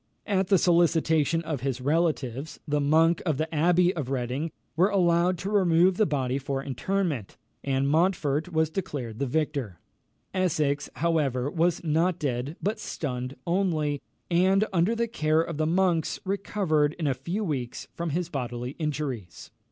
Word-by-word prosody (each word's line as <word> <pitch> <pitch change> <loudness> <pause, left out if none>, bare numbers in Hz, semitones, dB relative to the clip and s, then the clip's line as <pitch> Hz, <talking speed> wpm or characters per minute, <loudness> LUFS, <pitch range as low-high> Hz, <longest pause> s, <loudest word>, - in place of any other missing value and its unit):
At 195 -3 +1
the 195 - +5
solicitation 165 -2 +3
of 155 -6 -3
his 130 -1 -2
relatives, 145 -2 -1
the 150 0 +1
monks 160 +3 +3
of 155 -6 -1
the 160 +2 -2
Abbey 175 +3 +3
of 145 -6 -3
Reading 135 +4 -2 0.3
were 180 +5 +4
allowed 175 -2 +3
to 195 +4 -4
remove 180 -2 +4
the 215 - +3
body 135 -3 -1
for 135 0 -3
interment, 145 - -2 0.3
and 135 0 0
Montfort 160 0 +1
was 160 -1 +1
declared 145 - -4
the 140 - 0
victor. 140 - -2 0.6
Essex, 150 -6 0
however, 145 -5 0
was 170 +1 +1
not 165 +3 +1
dead, 135 -1 -2
but 210 +3 -1
stunned 130 -2 -4
only, 165 -6 0 0.3
and, 190 +4 +4
under 185 +6 +2
the 235 0 0
care 155 -8 +1
of 165 -2 -5
the 155 0 +1
monks, 175 -2 +1
recovered 185 -6 0
in 165 - -4
a 140 - +2
few 170 - -3
weeks 130 - -3
from 170 0 -3
his 170 +3 -1
bodily 125 -5 -4
injuries. 140 - -4
160 Hz, 155 wpm, -27 LUFS, 140-175 Hz, 0.6 s, the